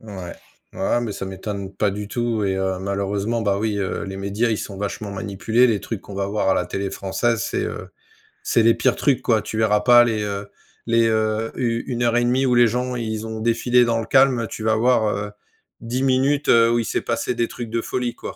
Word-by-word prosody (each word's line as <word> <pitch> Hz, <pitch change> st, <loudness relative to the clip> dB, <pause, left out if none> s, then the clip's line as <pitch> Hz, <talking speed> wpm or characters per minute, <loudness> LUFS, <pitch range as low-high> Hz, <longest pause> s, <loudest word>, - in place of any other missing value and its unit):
Ouais, 95 Hz, -5 st, -8 dB, 0.4 s
ouais, 110 Hz, +5 st, 0 dB
mais 115 Hz, -3 st, -3 dB
ça 95 Hz, -, -5 dB
m'étonne 95 Hz, 0 st, -6 dB
pas 100 Hz, +1 st, +1 dB
du 105 Hz, +1 st, -5 dB
tout 115 Hz, -1 st, -1 dB
et 95 Hz, -, 0 dB
heu, 95 Hz, -1 st, -1 dB
malheureusement 100 Hz, +3 st, -2 dB
bah 100 Hz, -2 st, 0 dB
oui, 105 Hz, -1 st, -1 dB
heu, 95 Hz, -2 st, -2 dB
les 95 Hz, -1 st, -6 dB
médias 100 Hz, +4 st, -1 dB
ils 110 Hz, -, 0 dB
sont 100 Hz, -, -6 dB
vachement 100 Hz, +1 st, -4 dB
manipulés, 100 Hz, +5 st, +1 dB
les 110 Hz, -4 st, 0 dB
trucs 115 Hz, -4 st, -6 dB
qu'on -, -, -12 dB
va 100 Hz, 0 st, -2 dB
voir 100 Hz, -1 st, 0 dB
à -, -, +3 dB
la -, -, 0 dB
télé 95 Hz, 0 st, -3 dB
française, 100 Hz, +3 st, -1 dB
c'est, -, -, -2 dB
heu, -, -, -6 dB, 0.5 s
c'est 115 Hz, -, +2 dB
les 115 Hz, +1 st, +5 dB
pires 130 Hz, +1 st, +1 dB
trucs 140 Hz, -3 st, +1 dB
quoi, 110 Hz, -3 st, +1 dB
tu 110 Hz, -, -5 dB
verras 105 Hz, -1 st, +3 dB
pas 120 Hz, +2 st, +7 dB
les, 110 Hz, -3 st, -1 dB
heu, 100 Hz, -1 st, -4 dB, 0.4 s
les, 115 Hz, 0 st, +3 dB
heu, 110 Hz, 0 st, 0 dB
u 115 Hz, -2 st, -1 dB
une 120 Hz, -2 st, -3 dB
heure 120 Hz, 0 st, +2 dB
et 120 Hz, -, +2 dB
demie 130 Hz, +2 st, +2 dB
où 125 Hz, -, +2 dB
les 120 Hz, 0 st, +6 dB
gens 125 Hz, +2 st, -2 dB
ils 110 Hz, -2 st, -3 dB
ont 110 Hz, 0 st, -5 dB
défilé 120 Hz, +2 st, +3 dB
dans 115 Hz, -1 st, +1 dB
le 115 Hz, -, -5 dB
calme, 135 Hz, -1 st, +4 dB
heu, 115 Hz, -, -3 dB
tu 110 Hz, -, -7 dB
vas 110 Hz, 0 st, +2 dB
voir, 115 Hz, -1 st, +3 dB
heu, 105 Hz, 0 st, -4 dB, 0.5 s
10 120 Hz, +3 st, -3 dB
minutes, 135 Hz, +2 st, +1 dB
heu, 115 Hz, 0 st, +5 dB
où 120 Hz, -, +2 dB
il 115 Hz, -, -2 dB
s'est -, -, -1 dB
passé 115 Hz, +1 st, -2 dB
des 115 Hz, 0 st, 0 dB
trucs 120 Hz, -2 st, -7 dB
de 115 Hz, +1 st, -1 dB
folie 120 Hz, 0 st, -3 dB
quoi. -, -, -8 dB
110 Hz, 240 wpm, -22 LUFS, 100-120 Hz, 0.5 s, pas